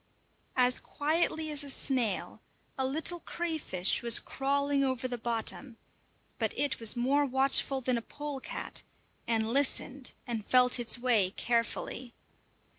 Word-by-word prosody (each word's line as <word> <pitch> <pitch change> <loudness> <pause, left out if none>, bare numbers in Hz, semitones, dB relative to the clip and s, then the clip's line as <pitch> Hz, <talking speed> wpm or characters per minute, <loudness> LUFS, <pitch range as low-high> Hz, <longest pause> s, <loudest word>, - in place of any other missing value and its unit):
As 250 0 +3
quietly 315 +1 0
as 290 -1 0
a 285 - -7
snail, 250 -7 -1 0.3
a 265 -1 0
little 320 +5 +1
crayfish 315 - -1
was 235 -1 +6
crawling 280 +1 0
over 260 -1 -1
the 250 - -3
bottom; 235 +2 -1 0.6
but 220 -3 -1
it 280 0 0
was 225 0 +4
more 270 +4 +2
watchful 270 0 +3
than 250 -1 0
a - - -9
polecat, 290 +2 -5 0.5
and 225 0 0
listened 275 -1 -1
and 235 -4 -4
felt 250 +2 +4
its 240 0 +1
way 235 -6 +3
carefully. 235 +1 -2
260 Hz, 130 wpm, -30 LUFS, 235-280 Hz, 0.6 s, was